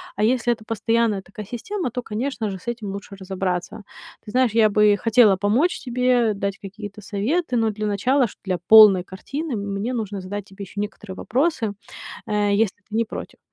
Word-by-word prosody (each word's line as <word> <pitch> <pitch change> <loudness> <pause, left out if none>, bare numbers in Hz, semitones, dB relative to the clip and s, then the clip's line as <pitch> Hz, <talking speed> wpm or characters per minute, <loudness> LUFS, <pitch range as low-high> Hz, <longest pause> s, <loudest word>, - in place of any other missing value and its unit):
А 210 - -1
если 240 +1 +2
это 220 - -11
постоянная 225 -2 0
такая 200 +1 -10
система, 340 - -4
то, 250 +1 -5
конечно 225 -1 -3
же, 190 - -6
с 235 - -20
этим 225 -4 -4
лучше 200 0 -8
разобраться. 190 +2 -4 0.4
Ты 210 - -9
знаешь, 255 -3 +3
я 220 -1 +4
бы 210 0 +4
хотела 225 -3 +5
помочь 225 - +1
тебе, 245 -3 +1
дать 200 +1 -3
какие-то 205 +1 -9
советы, 245 - -1
но 225 -2 +2
для 215 0 -3
начала, 250 +6 +2
шт - - -15
для 185 -3 -2
полной 210 -5 +9
картины, 275 - -5
мне 200 +3 -3
нужно 205 -4 -3
задать 200 +2 -5
тебе 200 0 -10
ещё 200 +2 -8
некоторые 210 -2 -5
вопросы, 250 - 0 0.5
э, 205 -1 +1
если 210 -1 +1
ты 215 - -7
не 230 - +3
против. - - -8
215 Hz, 185 wpm, -22 LUFS, 200-240 Hz, 0.5 s, полной